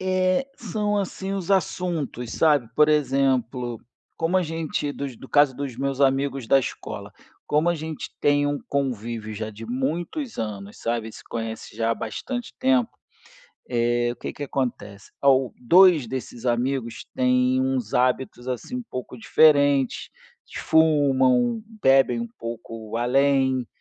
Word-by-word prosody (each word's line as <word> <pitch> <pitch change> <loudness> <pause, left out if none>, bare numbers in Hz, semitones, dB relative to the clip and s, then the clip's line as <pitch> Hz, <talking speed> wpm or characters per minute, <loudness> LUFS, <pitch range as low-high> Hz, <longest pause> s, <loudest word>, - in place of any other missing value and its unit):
É, 185 +5 +1
são 210 -1 -2
assim 195 -1 -3
os 195 -2 -4
assuntos, 170 - -1
sabe? 145 -7 +3
Por 150 +4 +5
exemplo, 130 -4 +1 0.4
como 165 +3 +1
a 185 - +3
gente 160 -3 -3
dos 140 -4 -6
no 135 - -12
caso 145 -3 +4
dos 140 -4 -5
meus 135 +1 -2
amigos 135 -2 +1
da 135 - +5
escola, 135 - -6 0.3
como 150 +3 +2
a 175 - +2
gente 160 -1 -6
tem 145 0 +3
um 145 0 -1
convívio 115 -5 -3
já 110 +1 -4
de 110 +2 -10
muitos 165 - -3
anos, 105 -2 -5
sabe, 115 -1 -2
se - - -13
conhece 115 -2 -6
já 115 0 +1
há - - +2
bastante 245 - -5
tempo, 260 -2 +2 0.8
é, 120 0 +1
o - - -12
que - - -6
que - - -8
acontece? 110 -7 -4
Ao 135 -2 +4
2 170 +1 +6
desses 120 -1 -6
amigos 120 -1 -1
têm 125 0 +2
uns 130 -4 -1
hábitos, 125 0 0
assim, 130 - -4
um 250 - -4
pouco 125 0 -6
diferentes, 140 0 +3 0.5
fumam, 155 - +3 0.2
bebem 135 -3 +4
um 115 - -4
pouco 115 -1 -6
além 130 +1 +2
135 Hz, 145 wpm, -24 LUFS, 120-155 Hz, 0.8 s, 2